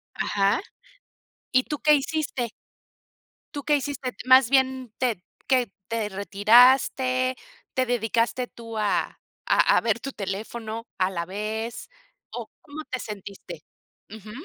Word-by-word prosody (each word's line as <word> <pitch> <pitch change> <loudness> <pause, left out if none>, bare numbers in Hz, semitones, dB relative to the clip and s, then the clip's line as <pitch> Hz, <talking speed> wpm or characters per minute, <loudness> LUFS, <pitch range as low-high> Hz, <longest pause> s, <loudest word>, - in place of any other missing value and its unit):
Ajá, 200 +2 +1 0.9
¿y 255 0 +4
tú 295 - -4
qué 300 0 +5
hiciste? 280 -4 -2 1.1
¿Tú 285 - -4
qué 300 - +3
hiciste? 275 -2 -4
Más 260 -1 +7
bien 260 -3 +2
te 230 -9 -1 0.2
¿qué 250 -5 +2 0.2
te 225 -2 -2
retiraste, 255 +5 +4 0.4
te 260 0 +2
dedicaste 235 +1 0
tú 230 -2 -8
a 210 -1 0 0.3
a - - +4
a - - +3
ver 230 0 +1
tu 275 - -5
teléfono 220 +2 -5
a 185 0 +1
la 170 -2 -3
vez, 215 +4 -4 0.4
o - - -6
cómo 305 +1 -8
te 255 - -3
sentiste? 195 -5 -8 0.5
Ujú. 215 0 -10
235 Hz, 130 wpm, -25 LUFS, 210-260 Hz, 1.1 s, Más